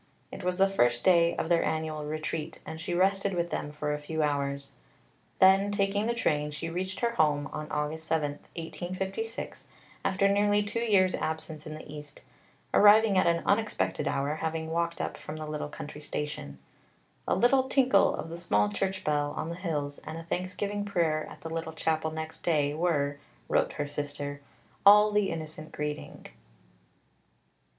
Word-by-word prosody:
It 195 - -8
was 180 0 0
the 195 0 +5
first 120 -11 +2
day 170 -2 +5
of - - -2
their 170 0 +3
annual 155 -1 -2
Retreat, 155 +1 -4
and 160 0 -7
she 175 +1 -2
rested 195 +1 +2
with 170 0 -1
them - - -2
for 150 0 -2
a 150 - -3
few 155 +1 -2
hours. 140 -1 -1 0.7
Then, 190 +1 +6
taking 205 +1 +1
the 235 - 0
train, 150 -9 +1
she 155 +3 -5
reached 185 +2 -3
her 235 -1 +2
home 150 -7 +2
on 155 0 -5
August 150 +2 -2
7, 155 -3 +1 0.2
1856, 190 +6 -5 0.4
after 195 +1 +2
nearly 205 +1 +3
two 205 +3 -3
years' 200 -5 +3
absence 160 -1 -3
in 155 - -6
the 155 - -10
East, 145 -1 -9 0.5
arriving 210 0 +7
at 185 - +4
an 170 0 +2
unexpected 215 +1 +1
hour, 145 +3 0
having 160 0 -3
walked 170 0 -1
up - - -3
from 150 - -7
the 155 - -5
little 150 -1 -4
country 150 0 -8
station. 150 0 -5 0.7
"A - - +2
little 260 +2 +3
tinkle 260 -7 +4
of - - -6
the 165 - -6
small 105 -12 +2
church 190 - -2
bell 145 -1 0
on 160 - -3
the 170 - -4
hills, 150 -6 -3
and 160 - -7
a 165 - -7
thanksgiving 185 +4 -2
prayer 170 -6 0
at - - -12
the 165 0 -6
little 165 -1 -3
chapel 160 0 0
next 160 0 -6
day, 145 -4 +1
were," 145 -4 0 0.3
wrote - - +1
her 145 - -2
sister, 145 0 -4 0.4
"all 210 +1 +8
the 210 -1 +2
innocent 155 -1 -6
greeting." 150 0 -5
160 Hz, 175 wpm, -29 LUFS, 150-195 Hz, 0.7 s, all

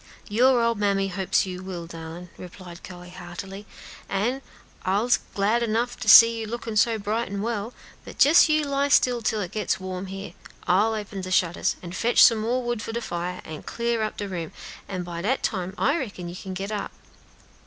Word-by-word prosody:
"Your 245 +3 +4
ole 230 0 +3
mammy 200 -2 0
hopes 190 +1 +1
you 185 -1 -6
will, 185 -3 -6
darlin'," 165 +1 -9
replied 180 -1 -11
Chloe, 180 -1 -10
heartily; 190 +3 -8 0.4
"an' 235 +7 -1 0.4
I'se 205 +6 +2 0.2
glad 210 +4 +2
'nough 235 +3 0
to 215 - -1
see 230 +1 +9
you 220 - -4
lookin' 230 0 -5
so 225 +2 +3
bright 215 +2 -2
an' 200 0 -3
well; 225 -1 -2 0.3
but - - +3
jes 315 +2 +6
you 310 0 +3
lie 280 0 0
still 250 -4 +3
till 220 -1 0
it 180 - -5
gets 215 - -1
warm 185 0 -5
here. 195 -2 -7 0.3
I'll 210 +5 +3
open 205 -2 -5
de 185 - -6
shutters, 180 -2 +1
an' 170 - -7
fotch 230 +6 +4
some 225 -2 +6
more 240 +4 -1
wood 240 -2 -2
for 225 - -5
de 235 - -2
fire, 180 -4 -4
an' 155 -1 -7
clar 235 -1 -2
up 215 - -3
de 205 - -4
room, 170 -4 -5 0.3
an' 185 -2 -4
by 170 -1 -6
dat 240 +9 0
time 190 -2 -2
I 285 - +2
reckon 200 -8 -6
you 175 - -8
can 185 0 -7
get 195 +3 -4
up." 210 -1 -3
200 Hz, 200 wpm, -25 LUFS, 185-230 Hz, 0.4 s, see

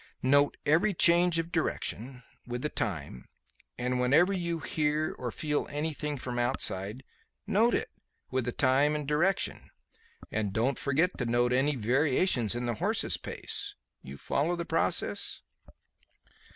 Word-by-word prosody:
Note 145 +2 +3
every 170 +7 +3
change 170 0 +4
of 165 +1 -2
direction, 130 - -2 0.2
with 120 0 -4
the 150 - 0
time; 70 - -4 0.5
and 125 +1 -1
whenever 155 +10 +4
you 170 -3 -2
hear 155 0 -1
or 125 - -3
feel 150 +4 -2
anything 150 0 -3
from 125 -1 -4
outside, 105 0 0 0.4
note 230 +4 +3
it, - - -2 0.4
with 130 -2 0
the 120 - -1
time 140 +4 +3
and 150 -2 -4
direction; 170 +6 0 0.6
and 105 -3 -1
don't 120 +6 0
forget 160 +6 +1
to 125 - -1
note 120 +1 +2
any 140 +3 +2
variations 130 - +1
in 120 0 -2
the 120 - 0
horse's 105 - 0
pace. - - -4 0.3
You 70 +1 -10
follow 155 - 0
the 170 0 -4
process?" - - 0
140 Hz, 140 wpm, -29 LUFS, 120-160 Hz, 0.6 s, change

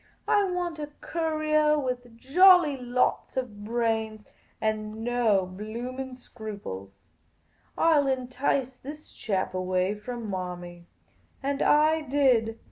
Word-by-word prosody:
I 410 -1 +4
want 350 -3 -3
a 295 -1 -5
courier 310 -2 +1
with 250 -4 -4
jolly 350 +3 +6
lots 250 0 -1
of 215 -6 -4
brains 220 -1 -1 0.3
and 215 0 -2
no 230 -5 +2
blooming 240 +7 -6
scruples. 100 - -9 0.7
I 325 -2 +5
'11 270 -2 +1
entice 260 0 -1
this 295 +4 -10
chap 190 -4 -2
away 185 +1 0
from 230 +2 -6
Marmy.' 175 -2 -6 0.6
And 280 0 -1
I 310 +2 +4
did. 250 -6 +2
245 Hz, 115 wpm, -27 LUFS, 215-290 Hz, 0.7 s, jolly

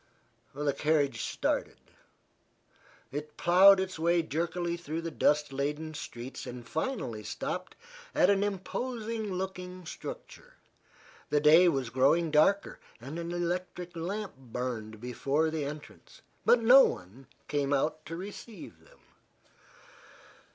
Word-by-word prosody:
The 145 0 0
carriage 150 -1 +1
started. - - -1 1.3
It 150 +2 -6
plowed 190 +3 +7
its 190 -3 -3
way 170 +1 +3
jerkily 170 +3 -2
through 165 -1 -5
the 165 - -4
dust 150 -2 +2
laden 150 +3 -2
streets 125 -3 -7
and 120 -1 -8
finally 155 - -3
stopped - - -4 0.4
at - - +5
an 200 0 +3
imposing 220 +2 -3
looking 185 -1 -5
structure. - - -9 0.7
The 150 - +3
day 160 +4 +7
was 135 -6 -2
growing 145 +6 +3
darker, 155 +7 +3 0.2
and 140 +8 -7
an 170 0 -4
electric 175 0 -3
lamp 195 +5 -4
burned 120 -4 -5
before 140 +6 0
the 155 -3 -2
entrance. 150 +1 -10 0.2
But 235 -1 +5
no 260 +4 +9
one 105 +10 -4 0.2
came 145 -1 -1
out 150 +3 0
to 165 - -5
receive 205 +4 -9
them. - - -22
160 Hz, 125 wpm, -30 LUFS, 140-185 Hz, 1.3 s, no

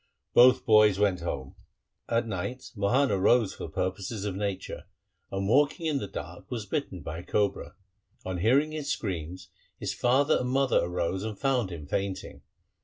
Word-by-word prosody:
Both 125 +1 +6
boys 105 -3 +6
went 100 -3 +2
home. 70 -6 -4 0.6
At 115 0 +1
night 115 +5 -5
Mohan 125 +7 +2
arose 105 +3 +3
for - - -7
purposes 95 +3 -3
of 100 -3 -2
nature, 100 -1 -4 0.5
and 95 0 -2
walking 145 - +3
in 150 -3 +1
the 100 - -4
dark 95 - -8
was 115 -4 -4
bitten 95 - -3
by 80 +3 -6
a - - -8
cobra. 100 -1 -1 0.5
On 95 -1 -3
hearing 135 - +3
his 150 -2 -4
screams 90 -2 -4 0.3
his 100 -1 -2
father 130 +7 +3
and 125 - -2
mother 135 0 +3
arose 90 +2 -1
and 110 -2 -4
found 130 -6 +1
him 85 -5 -7
fainting. 95 +5 -3
105 Hz, 165 wpm, -28 LUFS, 95-125 Hz, 0.6 s, Both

